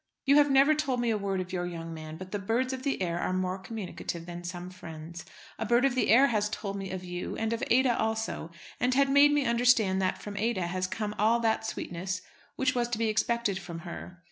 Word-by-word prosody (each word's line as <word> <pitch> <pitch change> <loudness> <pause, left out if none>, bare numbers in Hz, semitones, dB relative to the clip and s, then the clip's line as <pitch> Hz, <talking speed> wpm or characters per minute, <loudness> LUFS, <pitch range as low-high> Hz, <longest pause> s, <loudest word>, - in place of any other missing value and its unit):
You 280 +1 +6
have 290 -1 +6
never 275 +3 +6
told 285 -5 -1
me 240 -1 +1
a 215 - +1
word 195 -1 -1
of 185 +1 -7
your 175 -1 -1
young 165 -1 -6
man; 155 0 -8
but 185 +2 -9
the 205 - -2
birds 235 +6 0
of 260 - -4
the 270 -8 -1
air 170 -1 -1
are - - -1
more 185 0 -1
communicative 190 -4 -6
than 175 0 -7
some 175 +1 -6
friends. 170 -1 -9 0.3
A 225 - -1
bird 240 +3 +4
of 270 - +2
the 255 - +1
air 255 +5 +7
has 210 -5 +1
told 200 -2 -4
me 195 -1 -5
of 185 -1 -5
you, 180 0 -5
and 225 +1 -1
of 230 - -3
Ada 255 -1 +4
also, 220 -6 -2 0.3
and 250 +1 +2
had 275 0 +4
made 285 +1 +7
me 290 -2 +2
understand 235 -5 +3
that 185 - 0
from 205 -1 -7
Ada 215 -4 0
has 185 +1 -2
come 210 +2 -3
all 225 +3 +4
that 220 -1 +1
sweetness 185 -1 -4 0.3
which 265 +2 +1
was 240 -1 0
to 240 - -1
be 225 0 +1
expected 215 -2 0
from 170 -3 -7
her. 180 +1 -8
210 Hz, 240 wpm, -29 LUFS, 180-240 Hz, 0.3 s, air